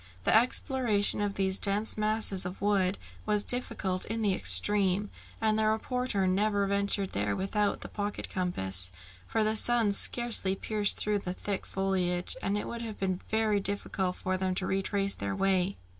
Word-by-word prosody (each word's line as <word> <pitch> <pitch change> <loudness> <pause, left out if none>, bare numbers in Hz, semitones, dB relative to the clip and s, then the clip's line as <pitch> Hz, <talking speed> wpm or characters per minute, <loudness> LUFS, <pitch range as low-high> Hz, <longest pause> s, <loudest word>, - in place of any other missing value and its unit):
The - - +3
exploration 230 -3 +2
of 205 -1 -2
these 190 0 0
dense 205 +2 0
masses 215 -3 +1
of 180 +1 -6
wood 195 -1 +1 0.3
was 210 -1 +1
difficult 190 -7 0
in 225 +1 -3
the 200 -2 +2
extreme, 200 +1 +4 0.3
and 220 -1 +1
the 215 - +2
reporter 220 -2 -1
never 200 +2 +1
ventured 200 0 -1
there 100 0 -1
without 205 - -1
the - - -6
pocket 205 0 -4
compass, 95 - -1 0.4
for 225 - 0
the 215 +1 +1
sun 230 -2 +3
scarcely 225 -3 +3
pierced 210 +1 -1
through 210 -1 0
the 180 -2 -4
thick 200 0 -4
foliage, 180 -2 0
and 200 +1 -1
it - - -4
would 235 0 -6
have 220 -3 -7
been 185 -1 -2
very 220 -2 +1
difficult 195 -2 -3
for 185 0 -2
them 185 0 -1
to 190 - -2
retrace 195 +1 -1
their 100 -1 -4
way. 190 - +1
200 Hz, 170 wpm, -29 LUFS, 190-215 Hz, 0.4 s, extreme